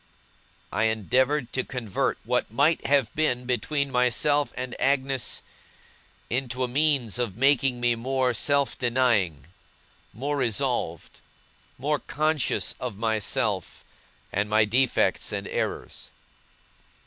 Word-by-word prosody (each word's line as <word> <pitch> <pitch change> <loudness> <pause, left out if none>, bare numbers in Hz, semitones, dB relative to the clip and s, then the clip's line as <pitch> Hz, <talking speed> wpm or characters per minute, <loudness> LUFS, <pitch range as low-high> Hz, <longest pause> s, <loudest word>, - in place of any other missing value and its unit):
I 105 +3 +2
endeavoured 125 +5 +1
to 130 - 0
convert 125 -7 -2
what - - 0
might 145 +8 +2
have 140 -5 +2
been 125 -6 0
between 140 +3 -1
myself 125 +3 +2
and 125 -1 -4
Agnes, 135 -1 +1 0.8
into 130 +1 -2
a - - 0
means 135 -4 +2
of 115 -5 -2
making 135 -1 +3
me 120 0 +2
more 130 +2 0
self 140 +3 +1
denying, 115 - +1 0.7
more 145 +4 -3
resolved, 120 - -1 0.6
more 145 +3 0
conscious 155 -1 0
of 120 -6 -5
myself, 110 -1 -1 0.5
and 100 +2 0
my 110 0 +4
defects 125 +4 +1
and - - -4
errors. - - -4
125 Hz, 115 wpm, -26 LUFS, 115-140 Hz, 0.8 s, my